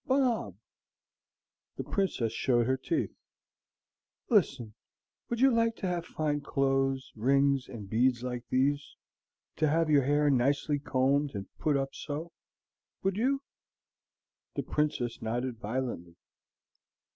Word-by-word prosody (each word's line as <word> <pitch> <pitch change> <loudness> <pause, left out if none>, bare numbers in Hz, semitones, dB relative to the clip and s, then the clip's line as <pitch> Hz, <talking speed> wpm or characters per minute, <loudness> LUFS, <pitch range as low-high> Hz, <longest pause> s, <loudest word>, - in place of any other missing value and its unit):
"Bob!" 260 -4 +1 1.2
The - - -4
Princess 185 - -1
showed 120 -3 +2
her 130 +2 +2
teeth. 315 - -2 1.2
"Listen. 135 - +2 0.6
Would 235 - -2
you 270 0 +6
like 230 -1 +2
to - - -5
have 175 -2 -2
fine 150 -2 -1
clothes, 135 -1 0
rings, 135 +3 +2
and 110 -5 -8
beads 120 +3 +2
like 125 -1 -4
these, 140 +3 +1 0.6
to 155 -1 +2
have 160 +1 +2
your 140 -3 +5
hair 145 +1 +3
nicely 140 +3 +2
combed 140 0 +1
and 100 -1 -7
put 150 -2 +2
up 135 0 -2
so? 155 +3 -5 0.7
Would 195 0 +1
you?" 270 +6 +1 1.1
The - - -1
Princess 145 -6 -1
nodded 120 +1 -2
violently. 110 -7 -4
140 Hz, 120 wpm, -30 LUFS, 125-155 Hz, 1.2 s, you